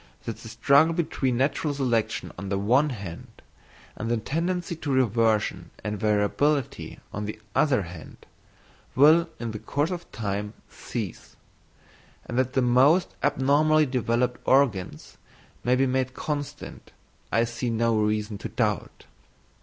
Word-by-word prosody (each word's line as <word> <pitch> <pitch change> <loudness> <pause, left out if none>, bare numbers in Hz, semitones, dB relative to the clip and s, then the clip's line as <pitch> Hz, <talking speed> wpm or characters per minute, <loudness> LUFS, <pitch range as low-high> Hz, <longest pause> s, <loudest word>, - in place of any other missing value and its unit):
That - - -5
the - - -10
struggle 155 +4 +4
between 135 -7 0
natural 145 +2 0
selection 120 -5 -1
on 95 +2 -6
the 100 - 0
one 125 +9 +3
hand, 100 -9 -8 0.5
and 115 - -4
the 120 - +2
tendency 170 +8 -2
to 150 -3 -4
reversion 115 -4 +1
and 105 -1 -3
variability 110 +7 0
on 105 +1 -3
the 105 +1 -6
other 130 -9 +3
hand, 85 -2 -10 0.8
will 160 +5 +6
in 115 -1 -3
the 110 - -6
course 145 - -1
of 175 -1 -6
time 105 -1 -3
cease; - - -7 0.9
and 120 - -6
that 130 0 0
the 130 - +2
most 135 +9 +4
abnormally 145 +3 +3
developed 125 -1 0
organs 105 - +1 0.5
may 125 +1 +3
be 135 +1 +3
made 130 0 -1
constant, 145 -3 -5 0.4
I 115 - +3
see 120 +1 -3
no 115 0 +1
reason 105 -1 0
to - - -5
doubt. 105 -5 -2
125 Hz, 140 wpm, -26 LUFS, 110-145 Hz, 0.9 s, will